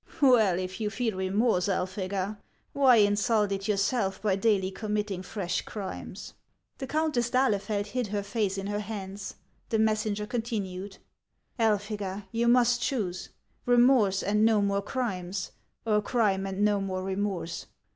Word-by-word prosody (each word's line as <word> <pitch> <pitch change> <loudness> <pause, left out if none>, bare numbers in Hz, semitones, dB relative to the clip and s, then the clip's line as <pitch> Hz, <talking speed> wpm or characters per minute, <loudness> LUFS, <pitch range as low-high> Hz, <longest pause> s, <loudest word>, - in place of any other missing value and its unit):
" - - -17
Well, 220 -9 +5
if 185 +3 -4
you 210 - 0
feel 225 -1 -2
remorse, 190 +1 +1
Elphega, 190 +2 -2 0.3
why 270 -3 +6
insult 210 0 +3
it 195 0 -2
your 210 -2 +1
self 200 -1 0
by 205 -3 +1
daily 195 -2 +1
committing 210 -2 -2
fresh 185 -1 -3
crimes 195 -1 -7 0.2
( - - -47
" - - -51
The 265 - -4
Countess 300 -6 0
d'Ahlefeld 210 -5 +1
hid 245 +2 -2
her 205 0 -2
face 200 -2 -1
in 195 - -4
her 205 +1 -2
hands; 200 -2 -6 0.3
the 225 - +1
messenger 215 -1 +1
continued: 205 -5 -4 0.3
" - - -41
Elphega, 205 -2 -1
you 235 +1 0
must 240 0 +4
choose: 195 -10 -2 0.4
remorse 240 -5 +4
and 210 +1 +2
more 200 -3 +3
crimes, 190 -6 -3 0.3
or 210 -2 +2
crime 200 -4 +1
and 195 +2 0
no 205 -1 +2
more 185 -1 -3
remorse. 190 -3 -3
205 Hz, 155 wpm, -28 LUFS, 195-225 Hz, 0.4 s, why